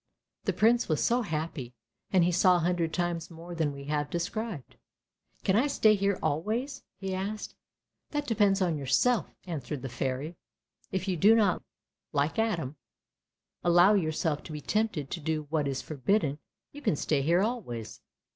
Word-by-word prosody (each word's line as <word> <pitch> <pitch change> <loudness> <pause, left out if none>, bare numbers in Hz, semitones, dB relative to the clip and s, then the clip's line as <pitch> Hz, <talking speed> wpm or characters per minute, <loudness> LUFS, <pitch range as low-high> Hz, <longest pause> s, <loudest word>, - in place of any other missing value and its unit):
The - - +1
Prince 230 0 +3
was 155 - +2
so 240 +1 +3
happy, 155 - -4 0.3
and 185 -3 +4
he 175 - +3
saw 180 +1 +5
a 175 - +1
hundred 170 -1 0
times 175 -1 -2
more 170 +1 -9
than 160 -3 0
we 140 0 -8
have 145 0 -1
described. 175 - -4 0.3
" - - -40
Can 190 - +2
I 245 +7 +4
stay 220 -6 +4
here 200 -1 +1
always? 230 - -1
" - - -58
he 195 -1 -3
asked. 200 +3 -4 0.3
" - - -57
That 295 -1 -2
depends 205 -5 +3
upon 165 -4 0
yourself," 220 - +2 0.2
answered 150 -5 -5
the 135 - -4
Fairy. 135 +6 -3 0.3
" - - -61
If 190 +1 -2
you 185 -2 0
do 210 +7 +6
not, 205 -5 +3 0.5
like 150 +7 +1
Adam, 165 - -1 0.9
allow 175 +3 +6
yourself 155 -4 0
to - - -8
be 150 - -4
tempted 190 -5 -1
to - - -3
do 155 0 -1
what 155 -3 +1
is 135 -1 -2
forbidden, 155 - 0 0.3
you 290 - -10
can 160 - +1
stay 145 0 0
here 170 +6 +3
always." 120 - -4
175 Hz, 180 wpm, -29 LUFS, 150-210 Hz, 0.9 s, do